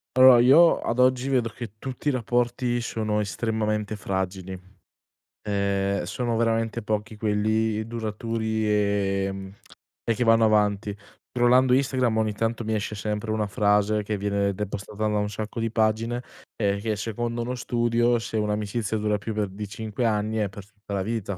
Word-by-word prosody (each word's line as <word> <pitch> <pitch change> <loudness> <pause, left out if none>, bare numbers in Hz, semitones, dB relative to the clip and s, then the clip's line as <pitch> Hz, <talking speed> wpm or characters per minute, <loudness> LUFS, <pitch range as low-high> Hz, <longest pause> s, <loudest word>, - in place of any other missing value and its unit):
Allora 130 -1 +8
io 150 +8 +6
ad 115 - -2
oggi 130 +1 +3
vedo 125 -4 +1
che 115 -2 -8
tutti 130 +5 -6
i - - +5
rapporti 120 0 0
sono 110 -2 -1
estremamente 105 0 -1
fragili. 95 -1 -4 0.8
Ehm, 100 -1 0
sono 115 +5 -2
veramente 115 0 0
pochi 105 0 -3
quelli 110 +1 0
duraturi, 110 -1 -2
ehm, 100 -2 0 0.5
e 115 - +1
che 125 - 0
vanno 115 -1 +5
avanti. 105 -1 +2 0.4
scrollando 125 +1 +4
Instagram 130 -4 +2
ogni 110 -1 +1
tanto 115 +2 -2
mi 110 - -2
esce 105 0 -2
sempre 105 +1 -3
una 110 -1 0
frase 105 +1 +2
che 105 0 -2
viene 100 0 0
de 105 +2 -3
postata 105 +2 -5
da 105 - 0
un 105 0 0
sacco 105 +3 -5
di 115 0 0
pagine 115 +2 0 0.3
e 100 -2 0
che 110 -1 -1
secondo 115 +2 -3
uno 125 +2 -3
studio 120 0 +1
se 115 - -4
un'amicizia 105 +1 -1
dura 105 0 0
più 105 +2 -5
per 105 -2 -1
di 105 +2 -6
5 110 +3 -4
anni 110 0 0
è 105 -2 +1
per 100 0 -10
tutta 105 0 -11
la 100 - 0
vita. 105 -2 -3
110 Hz, 165 wpm, -25 LUFS, 105-115 Hz, 0.8 s, Allora